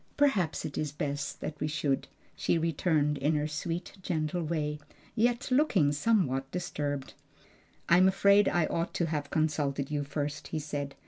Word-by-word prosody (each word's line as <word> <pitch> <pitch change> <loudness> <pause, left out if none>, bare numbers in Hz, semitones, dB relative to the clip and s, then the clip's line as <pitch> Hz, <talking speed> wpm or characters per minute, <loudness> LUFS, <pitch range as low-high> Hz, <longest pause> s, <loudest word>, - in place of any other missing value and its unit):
"Perhaps 210 - +2
it 140 - -4
is 150 -2 -2
best 145 -2 -4 0.2
we 150 - -1
should," 145 -3 -1 0.3
she - - +1
returned, 155 -3 +1
in 150 +3 +2
her 150 0 0
sweet, 165 +5 -4
gentle 165 -1 -1
way, 150 -2 -2 0.3
yet 240 +2 +1
looking 225 - +4
somewhat 145 - +1
disturbed. 145 -5 -3 0.7
"I'm 180 +2 +6
afraid 200 +1 +5
I 175 -2 +2
ought 165 +2 -2
to 170 - +1
have 150 -3 -3
consulted 145 -3 0
you 145 -1 0
first," 145 0 -4
he - - -3
said. 145 -2 -4
155 Hz, 150 wpm, -30 LUFS, 145-175 Hz, 0.7 s, I'm